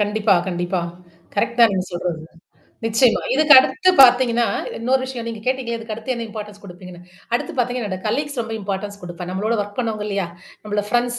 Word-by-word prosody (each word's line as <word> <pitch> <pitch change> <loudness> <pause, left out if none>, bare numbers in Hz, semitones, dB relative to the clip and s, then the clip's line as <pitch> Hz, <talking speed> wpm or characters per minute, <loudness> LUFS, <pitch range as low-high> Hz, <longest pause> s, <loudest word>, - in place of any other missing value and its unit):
கண்டிப்பா 210 0 +2
கண்டிப்பா. 175 +1 -2 0.5
கரெக்ட் 235 +4 -1
தான் 230 -3 +7
நீங்க 185 -1 -1
சொல்றது. 175 -2 -3 0.6
நிச்சயமா. 225 +2 +3
இதுக்கு 305 +1 +5
அடுத்து 365 +7 +3
ப்த்தீங்கன்னா, 240 -2 +6 0.3
இன்னொரு 255 +3 +1
விஷயம் 250 -3 -6
நீங்க 225 -2 -6
கேட்டீங்களேன், 255 -3 -1
இதுக்கு 225 -1 -6
அடுத்து 230 +4 -4
என்ன 235 -1 -4
இம்பார்ட்டன்ஸ் 210 -1 -8
குடுப்பீங்கன்னு. 180 -1 -11 0.3
அடுத்து 335 +7 -2
பார்த்தீங்கன்னா 245 -3 -1
என்னுட 185 -1 -4
காலீக்ஸ் 285 +4 -2
ரொம்ப 225 -1 -5
இம்பார்டன்ஸ் 200 +1 -4
குடுப்பேன். 175 0 -7
நம்மளோட 205 +5 -1
வொர்க் 205 +3 -6
பண்ணுவோங்க 220 -3 -2
இல்லையா? 195 -3 -2 0.4
நம்மள 210 0 -1
ஃப்ரெண்ட்ஸ் 240 +1 0
220 Hz, 170 wpm, -21 LUFS, 200-245 Hz, 0.6 s, தான்